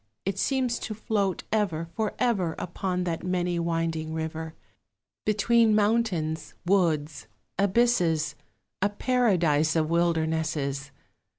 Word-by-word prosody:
It 195 0 -2
seems 255 -2 0
to 215 - -5
float 205 -3 -1
ever, 180 -7 0
for 215 +4 -2
ever, 190 -9 +1
Upon 180 +1 -2
that 170 -2 -3
many 180 -1 0
winding 165 -1 -1
river, 160 0 -4 0.7
Between 220 +1 +4
mountains, 205 -8 0
woods, 165 -5 +1 0.3
abysses, 185 -7 +2 0.5
A 205 - +3
paradise 180 - +2
of 160 0 +1
wildernesses! 160 -5 0
175 Hz, 105 wpm, -27 LUFS, 160-210 Hz, 0.7 s, Between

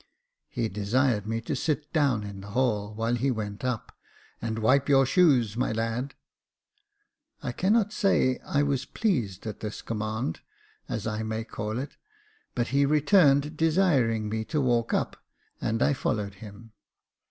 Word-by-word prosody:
He 115 - -1
desired 105 +2 0
me 115 +1 -1
to 120 - -3
sit 150 -2 -2
down 140 -9 +2
in 100 -1 -7
the 100 - -10
hall, 105 -5 +1
while 115 +2 0
he 125 +3 +1
went 105 -4 -4
up; 125 -4 -3 0.2
" - - -30
And 110 -1 -2
wipe 130 +6 +3
your 135 -1 +6
shoes, 130 - +3
my 120 - 0
lad." 115 +4 -2 1.3
I - - -2
cannot 210 +2 +2
say 195 - +2
that - - -22
I 145 0 +2
was 140 -2 0
pleased 125 - -1
at 110 -2 -5
this 105 -1 -6
command, 110 -3 -3 0.5
as - - -3
I 110 -1 -2
may 110 0 -3
call 110 0 -4
it, 135 +3 -5 0.6
but 120 -2 0
he 140 +1 +3
returned, 150 0 +4
desiring 150 - +2
me 110 +1 -2
to 150 +4 -1
walk 120 -4 +1
up, - - -1 0.4
and 115 +1 0
I - - +3
followed 105 -6 -2
him. 105 +3 -12
120 Hz, 165 wpm, -27 LUFS, 110-140 Hz, 1.3 s, your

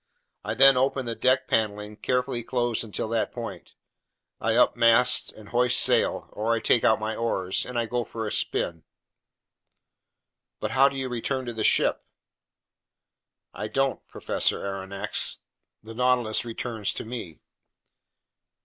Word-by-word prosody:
I - - -3
then 135 -1 +7
open 135 0 +1
the 115 - -2
deck 130 +2 +1
paneling, 105 -1 -1
carefully 125 +1 -1
closed 120 -1 -1
until 110 0 -4
that 115 -1 -1
point; 115 -7 -8 0.6
I 110 +1 0
up 125 - +4
mast 120 +1 +4
and 105 -1 -14
hoist 125 +2 +2
sail—or 110 +2 +1
I 115 - +2
take 115 - +2
out 110 - +4
my 110 +1 -3
oars—and 115 +2 -2
I 120 - +1
go 120 +1 -2
for 115 0 -6
a 105 - -3
spin." 85 -2 -1 1.8
"But - - -3
how 135 +1 +5
do 135 - -7
you 135 -1 -2
return 130 +2 -3
to 120 - -5
the 110 -1 -3
ship?" - - +2 1.5
"I 105 - -5
don't, 135 +3 -1
Professor - - -1
Aronnax; 100 +1 -1 0.4
the 110 +1 -10
Nautilus 120 -2 +1
returns 115 -2 -3
to - - -5
me." 110 -9 -8
115 Hz, 140 wpm, -26 LUFS, 110-125 Hz, 1.8 s, then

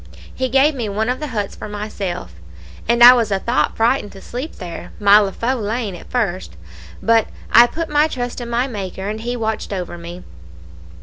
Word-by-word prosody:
He 260 0 -2
gave 270 +4 +4
me 240 -6 -3
one 215 +3 -1
of 250 - -1
the 305 - -4
huts 210 -6 -3
for - - -8
myself, 200 - -5 0.6
and 235 0 +5
I 245 +1 +12
was 235 -4 +1
a 195 - +1
thought 235 +6 0
frightened 225 -1 +1
to 195 - -12
sleep 260 +7 -6
there 175 -2 -8
my 205 0 +7
leafu' 215 +5 -1
lane 215 -1 -2
at 175 - -11
first, 190 - -2 0.5
but 225 -1 +3 0.2
I 240 +1 +8
put 330 +6 -4
my 300 +1 +3
trust 245 -4 -4
in 235 - -6
my 240 +2 +1
Maker, 195 -5 -5
and 215 +1 -4
He 240 +2 -3
watched 220 -3 -3
over 180 -3 -5
me. 175 +1 -9
220 Hz, 195 wpm, -19 LUFS, 200-245 Hz, 0.6 s, I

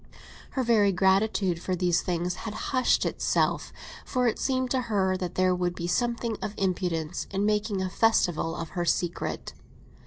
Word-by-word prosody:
Her 260 - +2
very 215 -4 +4
gratitude 190 -1 +2
for 185 - -1
these 175 -1 +2
things 175 0 -1
had 210 +3 -6 0.2
hushed 255 -2 +3
itself; - - 0 0.3
for 250 -2 0
it 225 - 0
seemed 260 -1 0
to 260 - +2
her 190 -3 +2
that 180 -2 -4
there 185 0 +3
would 180 -1 -1
be 170 - -4
something 235 +3 -1
of 210 - -4
impudence 175 -3 -1
in 195 +1 -1
making 210 -2 0
a - - -1
festival 175 -8 +2
of 165 -2 -5
her 175 -2 -2
secret. 175 +1 -2
190 Hz, 165 wpm, -27 LUFS, 175-220 Hz, 0.3 s, very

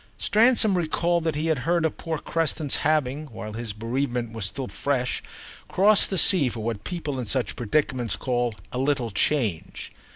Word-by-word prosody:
Stransom 220 -1 +3
recalled 170 0 0
that 160 -2 0
he 150 +2 -1
had 160 -4 +1
heard 170 +4 +1
of 160 - -1
poor 165 -1 -4
Creston's 155 -2 0
having, 150 -1 0
while 110 -4 -8
his 115 -1 -4
bereavement 120 +2 -3
was 110 -4 -2
still 125 +6 -5
fresh, 130 -4 -1 0.5
crossed 205 +2 +4
the 190 - -1
sea 170 -6 +5
for 115 -1 -6
what 110 -2 -3
people 150 -7 -4
in 120 - -4
such 130 +3 0
predicaments 120 -3 0
call 120 +1 -1 0.2
a 125 - -3
little 130 -4 0
change. 105 - -1
135 Hz, 170 wpm, -25 LUFS, 120-160 Hz, 0.5 s, sea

